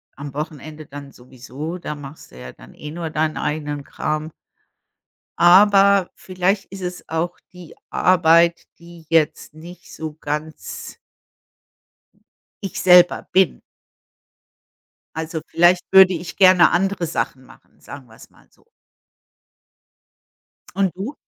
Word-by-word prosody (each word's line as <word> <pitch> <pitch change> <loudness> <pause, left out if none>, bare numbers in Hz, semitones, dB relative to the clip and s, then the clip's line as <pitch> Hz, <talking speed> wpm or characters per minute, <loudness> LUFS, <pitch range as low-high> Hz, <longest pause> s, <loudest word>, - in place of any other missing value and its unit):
am 140 -1 -9
Wochenende 155 0 -7
dann 140 0 -11
sowieso, 130 +7 -9
da 150 - -6
machst 145 +1 -12
du 65 - -14
ja 65 0 -9
dann - - -17
eh 150 0 -9
nur 165 -1 -5
deinen 155 0 -2
eigenen 150 -1 -4
Kram. 155 +2 -4 1.1
Aber 195 +1 +5
vielleicht 190 +2 -2
ist 195 -1 -11
es 180 0 -7
auch 165 +2 -3 0.2
die 180 -3 -13 0.2
Arbeit, 170 -1 +3 0.2
die 170 -1 -15
jetzt 160 -3 0
nicht 170 +2 -13
so 155 -1 -7
ganz 150 +2 -6 1.7
Ich 195 - -5
selber 180 -1 +5
bin. 190 -4 +2 1.6
Also, 160 0 -4
vielleicht 175 +1 +3
würde 190 -1 +7
ich 170 0 -7
gerne 185 -2 +5
andere 185 -1 0
Sachen 130 -4 -4
machen, - - -21
sagen 140 -3 -12
wir 110 - -18
es - - -17
mal - - -25
so. - - -31 2.1
Und 195 -2 0
du? 215 +10 -6
165 Hz, 125 wpm, -20 LUFS, 150-180 Hz, 2.1 s, würde